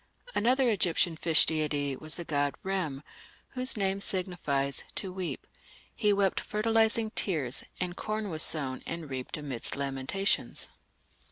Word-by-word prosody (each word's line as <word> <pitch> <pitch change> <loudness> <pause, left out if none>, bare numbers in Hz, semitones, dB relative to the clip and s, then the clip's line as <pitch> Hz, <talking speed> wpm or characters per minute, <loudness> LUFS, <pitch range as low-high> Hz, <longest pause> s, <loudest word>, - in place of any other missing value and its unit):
Another 255 +4 +3
Egyptian 180 -5 +2
fish 160 0 +5
deity 150 -3 0
was 155 +4 -1
the 175 - -5
god 145 -2 0
Rem, 170 -8 -1 0.5
whose 255 -2 +2
name 195 -1 +1
signifies 150 -9 0
"to 190 -2 -3
weep"; 185 -2 -4 0.5
he 210 -2 +3
wept 200 -2 +2
fertilizing 220 +1 +1
tears, 150 - +1 0.2
and 180 -1 -2
corn 215 -1 -3
was 155 -1 -1
sown 135 -6 +1
and 165 -4 -5
reaped 130 +2 -4
amidst 140 -6 -1
lamentations. 140 +8 -1
175 Hz, 135 wpm, -30 LUFS, 145-200 Hz, 0.5 s, fish